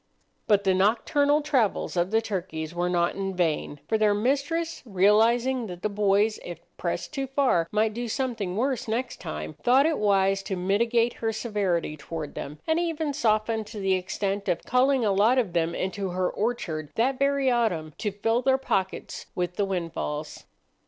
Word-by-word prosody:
But 205 -2 +4
the 190 -1 +3
nocturnal 285 +10 +2
travels 260 -13 0
of 175 +1 +1
the 225 +2 +2
turkeys 170 -6 -4
were 175 +1 -1
not 175 -1 +1
in 195 -1 -3
vain; 160 -4 -1
for 220 - +1
their 210 -1 +3
mistress, 285 +9 -1
realizing 230 +4 +3
that 180 -2 -9
the 215 - +1
boys, 205 +1 +2
if 175 -2 -7 0.2
pressed 175 - -3
too 275 -2 -2
far, 255 - +2
might 215 +1 +1
do 240 +2 -4
something 225 -7 -2
worse 255 0 -1
next 240 +3 -2
time, 75 0 -5
thought 260 +3 +5
it 320 -1 +1
wise 195 -1 +2
to 195 0 -4
mitigate 230 +6 +1
her 225 -1 +1
severity 205 -8 -1
toward 155 0 -6
them, 145 +2 -6
and 320 +1 +2
even 320 -3 -1
softened 220 -3 +1
to 215 -1 -8
the 195 -1 +1
extent 195 +2 -2
of 170 - 0
calling 255 0 +2
a 205 - +3
lot 210 +6 +4
of 220 -9 +1
them 170 -1 0
into 190 +1 -2
her 180 0 -1
orchard 170 -10 -2
that 255 +3 +1
very 275 -1 +2
autumn 180 -11 0
to 210 - -1
fill 225 +4 0
their 265 +1 +3
pockets 190 -8 -3
with 180 0 -2
the 205 - +1
windfalls. 165 -5 -4
210 Hz, 180 wpm, -26 LUFS, 185-245 Hz, 0.2 s, thought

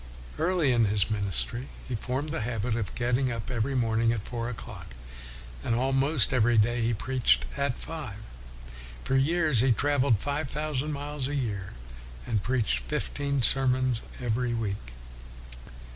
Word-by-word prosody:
Early 165 -4 +2
in 120 -2 +4
his 105 0 +1
ministry 105 +5 -1 0.2
he 130 - -4
formed 130 +6 -2
WESLEY 165 - -2
the 110 - -2
habit 115 0 -1
of 110 -4 -3
getting 125 +1 +1
up 115 +1 -4
every 125 +3 -1
morning 115 -1 +2
at 110 -4 -2
four 115 0 -4
o'clock; 110 - -8 0.7
and 115 - +1
almost 135 +2 +3
every 120 -1 +4
day 120 +3 +3
he 115 +1 +2
preached 125 +3 +2
at 140 -2 -1
five. 150 -11 -6 0.9
For 135 - 0
years 155 -1 +3
he 130 +2 +4
traveled 140 -1 +3
five 145 +5 -2
thousand 150 0 -2
miles 145 -1 -3
a 145 - -3
year 105 - -3 0.5
and 110 -3 0
preached 115 - +1
fifteen 140 - -2
sermons 130 -2 +2 0.2
every 120 0 0
week. 100 - -4
125 Hz, 150 wpm, -28 LUFS, 115-140 Hz, 0.9 s, in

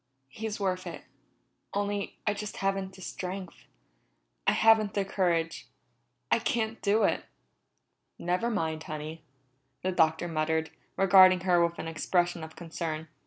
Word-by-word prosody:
"He's 215 +9 -5
worth 185 -2 -1
it - - -7 0.7
only 205 0 -2
I 210 - +2
just 210 0 -6
haven't 195 -1 -1
the 190 - -13
strength. 185 0 -6 0.8
I - - +7
haven't 220 -2 +4
the 200 -1 +1
courage. 170 -4 0 0.6
I - - +5
can't 225 -3 -1
do 210 +2 +3
it!" - - +1 0.9
"Never 180 +7 0
mind, 160 -8 -1
Honey," 155 +1 -6 0.6
the 185 - +1
Doctor 160 -1 +2
muttered, 160 0 0 0.3
regarding 185 -1 +7
her 175 -2 +4
with 170 0 0
an - - -5
expression 175 +2 0
of 160 0 -9
concern. 160 -2 -5
185 Hz, 135 wpm, -29 LUFS, 165-200 Hz, 0.9 s, I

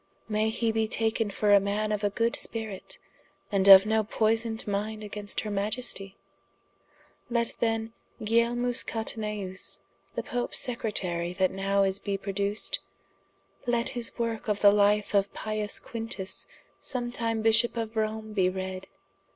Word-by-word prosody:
May 215 0 +1
hee 225 +1 0
be 220 0 +1
taken 220 0 0
for 205 +1 +2
a 200 - +8
man 205 +2 -1
of 210 0 -1
a 205 - +3
good 230 +3 0
spirit, 220 -4 -4 0.3
& - - -38
of 195 0 +9
no 220 0 +2
poysoned 225 +1 0
minde 215 +1 -2
against 205 0 -3
her 210 - -5
Maiestie? 205 -1 -2 1.1
Let 235 -1 0
then 225 -1 0 0.3
Guilielmus 235 +2 +1
Cataneus, 210 -4 -4 0.4
the - - -2
Popes 245 0 -3
Secretarie 180 -8 -2
that 185 -1 +3
now 195 +1 +1
is 195 0 +1
be 200 -1 -2
produced: 200 +1 -1 0.9
let 240 0 +1
his 240 -2 -4
worke 230 -2 -2
of 210 -1 0
the 205 - +8
life 205 0 +3
of 200 -1 +2
Pius 215 -1 -2
Quintus 225 -4 -4 0.3
sometime 235 -3 -2
bishop 230 +2 +6
of 225 0 -3
Rome 220 0 -2
be 185 -3 +3
read. 190 0 -5
215 Hz, 145 wpm, -28 LUFS, 200-225 Hz, 1.1 s, of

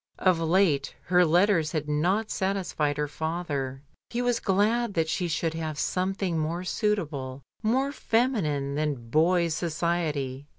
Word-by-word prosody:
Of 185 -3 +3
late 165 -4 +2
her 180 0 +4
letters 175 -1 +3
had 155 -2 -2
not 180 +9 +1
satisfied 180 -7 -1
her 150 0 0
father. 145 -4 -3 0.3
He 245 +1 -2
was 245 -1 +1
glad 210 +3 +1
that 165 -1 +1
she 175 +2 -1
should 165 0 -1
have 160 -2 -4
some 185 +4 0
thing 180 -5 -1
more 165 +3 -2
suitable, 150 - -2 0.2
more 260 +6 +1
feminine 210 - 0
than 140 -6 -2
boys' 170 +2 +3
society. 155 -4 -2
165 Hz, 140 wpm, -27 LUFS, 150-195 Hz, 0.3 s, her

